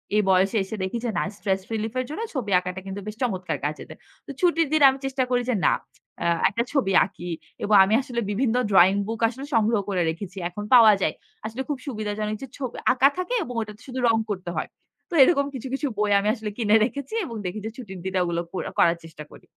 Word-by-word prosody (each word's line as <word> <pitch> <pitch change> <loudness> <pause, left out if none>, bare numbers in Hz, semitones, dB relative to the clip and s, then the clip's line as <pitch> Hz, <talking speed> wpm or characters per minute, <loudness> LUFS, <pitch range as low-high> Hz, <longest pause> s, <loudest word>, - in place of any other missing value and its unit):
এই 210 - +5
বয়সে 190 +3 +3
এসে 195 - -6
দেখি 190 +5 -2
যে - - 0
না - - +1
স্ট্রেস 195 -2 -1
রিলিফ 220 0 -2
এর 255 - -1
জন্য 315 +9 -5
ছবি 230 -8 -3
আঁকাটা 180 +1 -6
কিন্তু 195 +1 -5
বেশ 215 - -5
চমৎকার 185 - -1
কাজে 150 +1 -3
দেয়। - - -11 0.3
তো 280 - -7
ছুটির 335 -3 +3
দিন 310 - +3
আমি 265 - -2
চেষ্টা 265 -1 0
করি 245 -1 +2
যে - - +1
না। - - +4 0.5
আ - - -2 0.2
একটা 230 +3 -1
ছবি 265 -9 +1
আঁকি 175 -2 -9 0.3
এবং 210 - +3
আমি 200 +3 +1
আসলে 250 -3 -4
বিভিন্ন 235 +2 0 0.2
ড্রইং 190 0 +6
বুক 225 0 -4
আসলে 265 +4 -8
সংগ্রহ 220 0 +3
করে 185 -3 0
রেখেছি। 185 +4 -6
এখন 205 +4 -7
পাওয়া 225 -3 +9
যায়। - - 0 0.3
আসলে 225 +4 -4
খুব 290 - -1
সুবিধাজনক 215 -2 -3
যে 270 - -6
ছবি 260 -4 -5 0.2
আঁকা 265 +2 +5
থাকে 365 +7 -3
এবং 245 - -7
ওটাতে 210 0 -8
শুধু 255 0 -5
রং 225 -1 +4
করতে 185 -3 -4
হয়। - - -2 0.4
তো - - -10
এরকম 280 -2 +3
কিছু, 260 0 -6
কিছু 285 +1 -1
বই 210 0 +1
আমি 200 - -2
আসলে 215 -2 -5
কিনে 215 -2 +3
রেখেছি 280 - -6
এবং 230 - -7
দেখি 185 +4 -3
যে - - -2
ছুটির 195 -7 -8
দিনে 190 0 0
ওগুলো 170 -1 -1
করে 185 - -3
করার 170 0 +4
চেষ্টা 155 -1 -10
করি। - - -15
215 Hz, 225 wpm, -24 LUFS, 190-255 Hz, 0.5 s, পাওয়া